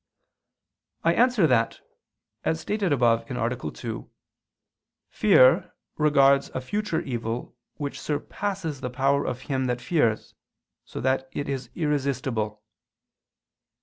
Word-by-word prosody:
I 165 Hz, -, +4 dB
answer 245 Hz, -3 st, +4 dB
that, 120 Hz, -6 st, +2 dB, 0.6 s
As 160 Hz, -, 0 dB
stated 200 Hz, +1 st, -1 dB
above 120 Hz, -3 st, +2 dB
(A. 120 Hz, -, -2 dB
2), -, -, -6 dB, 1.0 s
fear 155 Hz, -11 st, +5 dB, 0.2 s
regards 140 Hz, -2 st, +4 dB
a -, -, 0 dB
future 190 Hz, +4 st, -2 dB
evil 120 Hz, -4 st, -4 dB, 0.2 s
which 145 Hz, -2 st, -5 dB
surpasses 160 Hz, 0 st, -3 dB
the 125 Hz, -, -3 dB
power 140 Hz, +3 st, +1 dB
of 125 Hz, -, -3 dB
him 130 Hz, -1 st, -1 dB
that 125 Hz, -1 st, -1 dB
fears, 120 Hz, -6 st, 0 dB, 0.5 s
so -, -, -7 dB
that 130 Hz, +1 st, 0 dB
it 145 Hz, -, -3 dB
is 135 Hz, -2 st, -4 dB
irresistible. 130 Hz, -8 st, -1 dB
135 Hz, 115 wpm, -26 LUFS, 125-155 Hz, 1.0 s, fear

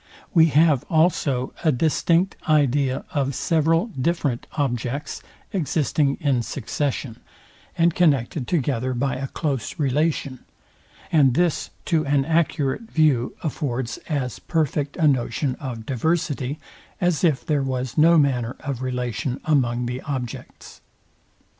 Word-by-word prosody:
We 165 Hz, -3 st, +6 dB
have 150 Hz, -3 st, +4 dB
also 155 Hz, -6 st, +1 dB
a 160 Hz, -, +4 dB
distinct 165 Hz, +6 st, +1 dB
idea 140 Hz, -3 st, +2 dB
of 140 Hz, -2 st, -1 dB
several 165 Hz, +2 st, +2 dB
different 150 Hz, -, -1 dB
objects 130 Hz, -1 st, -2 dB, 0.3 s
existing 150 Hz, -4 st, +1 dB
in 135 Hz, -5 st, +1 dB
succession, 130 Hz, 0 st, -3 dB, 0.6 s
and 170 Hz, 0 st, +3 dB
connected 140 Hz, -6 st, +1 dB
together 130 Hz, -6 st, 0 dB
by 135 Hz, +1 st, -1 dB
a 135 Hz, +1 st, -3 dB
close 135 Hz, -4 st, -3 dB
relation; 145 Hz, -2 st, 0 dB, 0.7 s
and 140 Hz, -6 st, +4 dB
this 175 Hz, -1 st, +1 dB, 0.2 s
to 160 Hz, -3 st, +2 dB
an 140 Hz, -1 st, +2 dB
accurate 165 Hz, -, 0 dB
view 145 Hz, -6 st, +2 dB
affords 130 Hz, -6 st, -3 dB
as 135 Hz, -6 st, -2 dB
perfect 150 Hz, -3 st, -1 dB
a 160 Hz, -4 st, +3 dB
notion 130 Hz, -1 st, 0 dB
of 120 Hz, -5 st, -6 dB
diversity, 145 Hz, 0 st, -1 dB, 0.4 s
as 175 Hz, -4 st, +1 dB
if 145 Hz, -8 st, +2 dB
there 150 Hz, -2 st, +1 dB
was 130 Hz, -2 st, -3 dB
no 165 Hz, +2 st, +6 dB
manner 125 Hz, -5 st, +1 dB
of 135 Hz, -3 st, -4 dB
relation 125 Hz, -1 st, -2 dB
among 125 Hz, -5 st, +1 dB
the 125 Hz, +2 st, -4 dB
objects. 130 Hz, -6 st, -7 dB
140 Hz, 120 wpm, -23 LUFS, 125-160 Hz, 0.7 s, We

